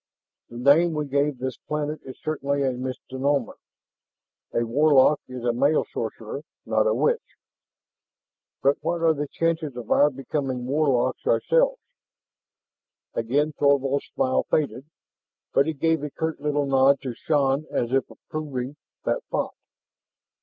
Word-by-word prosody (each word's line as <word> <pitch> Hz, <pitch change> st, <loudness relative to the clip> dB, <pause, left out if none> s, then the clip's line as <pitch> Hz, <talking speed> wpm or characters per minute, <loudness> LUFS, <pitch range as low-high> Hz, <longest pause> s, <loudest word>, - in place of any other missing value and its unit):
"The 120 Hz, -, -9 dB
name 150 Hz, +7 st, +5 dB
we 150 Hz, -1 st, -1 dB
gave 140 Hz, 0 st, 0 dB
this 130 Hz, +1 st, -4 dB
planet 150 Hz, 0 st, -3 dB
is 130 Hz, -, -9 dB
certainly 140 Hz, -2 st, -1 dB
a 135 Hz, -, +2 dB
misnomer. 130 Hz, +1 st, -2 dB, 1.0 s
A 120 Hz, -, 0 dB
warlock 145 Hz, +3 st, +4 dB
is 130 Hz, -1 st, -7 dB
a 120 Hz, -1 st, +1 dB
male 140 Hz, +6 st, +2 dB
sorcerer, -, -, -4 dB, 0.2 s
not -, -, +2 dB
a -, -, +3 dB
witch." 475 Hz, 0 st, +2 dB, 1.4 s
"And 140 Hz, +1 st, +4 dB
what 170 Hz, -1 st, -1 dB
are 165 Hz, -1 st, +5 dB
the 145 Hz, -1 st, -3 dB
chances 160 Hz, -3 st, -1 dB
of 120 Hz, -3 st, -7 dB
our 145 Hz, -, +6 dB
becoming 135 Hz, -2 st, -3 dB
warlocks 140 Hz, -, +1 dB
ourselves?" -, -, +2 dB, 1.3 s
Again 145 Hz, +7 st, 0 dB
Thorvald's 140 Hz, -1 st, +2 dB
smile 130 Hz, 0 st, +2 dB
faded, 140 Hz, -3 st, 0 dB, 0.7 s
but 140 Hz, -, +4 dB
he 160 Hz, -, 0 dB
gave 160 Hz, +1 st, +1 dB
a 150 Hz, -, -3 dB
curt 160 Hz, +3 st, -3 dB
little 145 Hz, 0 st, 0 dB
nod 135 Hz, 0 st, +4 dB
to 130 Hz, -3 st, -4 dB
Shann 140 Hz, +2 st, +1 dB
as 120 Hz, 0 st, -1 dB
if 135 Hz, -, +1 dB
approving 145 Hz, -3 st, -5 dB, 0.3 s
that -, -, 0 dB
thought. -, -, -1 dB
140 Hz, 140 wpm, -25 LUFS, 130-155 Hz, 1.4 s, our